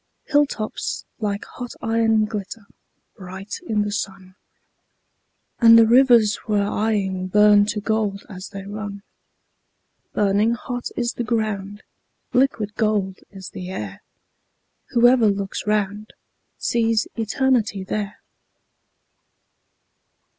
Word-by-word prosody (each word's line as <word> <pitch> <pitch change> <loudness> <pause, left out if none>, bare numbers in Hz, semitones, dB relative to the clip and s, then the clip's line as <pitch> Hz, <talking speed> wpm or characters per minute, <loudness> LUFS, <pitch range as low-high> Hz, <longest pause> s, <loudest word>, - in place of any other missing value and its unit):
Hill 290 -1 +3
tops 215 -5 -4
like 205 -2 -2
hot 245 -1 -8
iron 225 -1 +2
glitter 210 0 -6 0.5
bright 190 +2 -8
in 210 -1 +1
the 205 - -3
sun, 190 -2 -5 1.3
And 230 -1 +8
the 230 - +7
rivers 235 -3 +5
we're 205 -2 +2 0.2
eying 190 -3 -1
burn 205 +1 +5
to 210 - -2
gold 210 -2 -1
as 185 -2 -9
they 195 -1 -8
run; 205 0 -6 1.1
Burning 210 +3 +2
hot 245 +1 -5
is 240 -1 -1
the 240 - -3
ground, 210 -3 -2 0.5
liquid 245 -5 +1
gold 205 -3 0
is 190 -2 -10
the 185 -1 -7
air; 105 - -6 0.9
Whoever 240 -1 +5
looks 200 0 -2
round 210 0 -1 0.4
sees 225 -2 +1
Eternity 225 -3 0
there. 205 +1 -4
210 Hz, 110 wpm, -22 LUFS, 200-225 Hz, 1.3 s, And